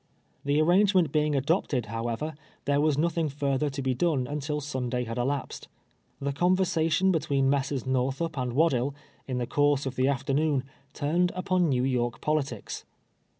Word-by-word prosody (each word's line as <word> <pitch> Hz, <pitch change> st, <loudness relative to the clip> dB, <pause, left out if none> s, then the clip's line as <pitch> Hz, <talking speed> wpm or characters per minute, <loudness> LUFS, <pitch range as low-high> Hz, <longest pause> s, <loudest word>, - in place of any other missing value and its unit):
The 145 Hz, +1 st, +2 dB
arrangement 180 Hz, 0 st, +4 dB
being 150 Hz, -1 st, +1 dB
adopted, 140 Hz, -2 st, +1 dB
liowever, 115 Hz, +7 st, -3 dB, 0.3 s
there 145 Hz, 0 st, +2 dB
was 150 Hz, -2 st, +2 dB
nothing 165 Hz, 0 st, +1 dB
further 140 Hz, +1 st, 0 dB
to 135 Hz, 0 st, -5 dB
be 130 Hz, -1 st, +1 dB
done 140 Hz, -2 st, +1 dB
until 150 Hz, +2 st, -3 dB
Sunday 130 Hz, -4 st, -2 dB
had 115 Hz, 0 st, -4 dB
elapsed. 135 Hz, +2 st, -2 dB, 0.5 s
The 140 Hz, 0 st, -2 dB
conversation 180 Hz, +1 st, +2 dB
between 140 Hz, -5 st, +1 dB
Messrs. 140 Hz, -2 st, 0 dB
Xorthup 135 Hz, +5 st, -1 dB
and 125 Hz, -3 st, -2 dB
'Waddill, 140 Hz, -2 st, +2 dB, 0.3 s
in 130 Hz, -2 st, -2 dB
the 125 Hz, -, -1 dB
course 145 Hz, +1 st, +2 dB
of 135 Hz, -1 st, -3 dB
the 130 Hz, +1 st, +3 dB
afternoon, 140 Hz, +1 st, +1 dB, 0.3 s
turned 175 Hz, +5 st, +1 dB
upon 185 Hz, -2 st, +1 dB
Xew 125 Hz, 0 st, +1 dB
York 120 Hz, -2 st, -1 dB
politics. 140 Hz, -7 st, -2 dB
140 Hz, 150 wpm, -27 LUFS, 130-155 Hz, 0.5 s, arrangement